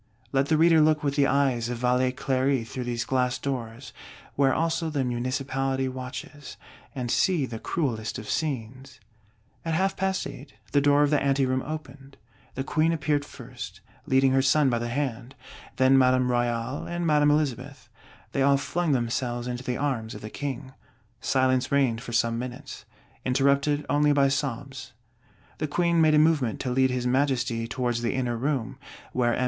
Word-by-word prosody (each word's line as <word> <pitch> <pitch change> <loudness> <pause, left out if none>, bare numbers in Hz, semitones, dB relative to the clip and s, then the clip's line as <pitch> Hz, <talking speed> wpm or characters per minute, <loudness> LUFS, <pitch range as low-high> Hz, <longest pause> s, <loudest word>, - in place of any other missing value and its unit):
Let 135 0 +1
the 155 - +2
Reader 165 0 +5
look 155 -1 +3
with 140 -1 0
the 140 -2 +3
eyes 130 -4 +1
of 120 - -3
Valet 125 +1 +2
Cléry 130 -2 0
through 125 +2 -5
these 120 0 -2
glass 125 -1 0
doors, 125 -2 -5 0.4
where 135 -1 +3
also 165 +2 0
the 145 -3 -1
Municipality 130 +2 -1
watches; 130 +2 -7 0.4
and 125 -3 -3
see 175 -7 +2
the 115 -3 -7
cruelest 115 -10 -2
of 110 - -8
scenes: 130 -4 -4 0.6
"At 165 -1 -1
half 190 +3 +1
past 190 0 -1
eight, 140 +1 -10 0.2
the 145 - +3
door 145 +1 +4
of 145 - +1
the 150 - +3
ante 135 -1 +2
room 130 0 0
opened: 140 -2 -8 0.4
the 135 - -2
Queen 160 +3 +1
appeared 145 -2 0
first, - - -10 0.3
leading 130 0 +4
her 135 0 +3
Son 135 +1 +3
by 120 - 0
the 120 - -3
hand; 125 -1 -3 0.4
then 130 0 +5
Madame 130 -1 +3
Royale 120 +2 -1
and 175 0 -3
Madame 150 -2 +4
Elizabeth: 140 -3 -1 0.4
they 135 - -1
all 140 +1 +4
flung 160 +3 -1
themselves 120 0 -1
into 125 0 -4
the 125 -1 -2
arms 125 -7 -2
of 105 - -9
the 110 - -8
King. 135 -2 -5 0.5
Silence 130 -1 +1
reigned 130 -5 +2
for 120 - -8
some 115 -1 +1
minutes; 125 +2 -7 0.4
interrupted 140 +3 +2
only 145 0 +3
by 140 -1 +4
sobs. 135 -1 -4 0.7
The 155 - -1
Queen 170 +2 +2
made 155 -1 +5
a - - +5
movement 150 -7 +2
to 130 - -2
lead 130 +1 +3
his 125 -1 -2
Majesty 125 -3 0
towards 120 -2 -2
the 120 - -1
inner 125 -2 -1
room, 130 -1 -2 0.3
where 120 -2 +1
M. - - -3
135 Hz, 175 wpm, -26 LUFS, 125-145 Hz, 0.7 s, Reader